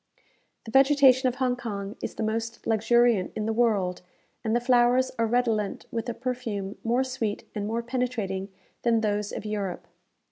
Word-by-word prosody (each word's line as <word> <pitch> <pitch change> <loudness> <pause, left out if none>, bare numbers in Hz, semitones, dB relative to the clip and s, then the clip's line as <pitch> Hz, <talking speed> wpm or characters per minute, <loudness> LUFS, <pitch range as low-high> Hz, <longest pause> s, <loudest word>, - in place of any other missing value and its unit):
The 225 - -8
vegetation 270 -1 +5
of 245 - -6
Hong 255 -2 +1
Kong 205 -3 -5
is - - -5
the - - -3
most 225 +1 -3
luxuriant 225 -2 +3
in 215 - -2
the 225 - 0
world, 210 -6 +1 0.4
and 220 0 0
the - - +4
flowers 245 +1 +3
are 230 - +3
redolent 225 -3 0
with 230 +1 -3
a 235 - -3
perfume 230 -6 -4
more 240 +3 +2
sweet 235 -5 -3
and 205 -1 -3
more 230 +2 -2
penetrating 230 -6 -2 0.3
than 230 -2 +2
those 210 -1 -1
of - - -6
Europe. 195 -5 -3
230 Hz, 170 wpm, -27 LUFS, 210-245 Hz, 0.4 s, vegetation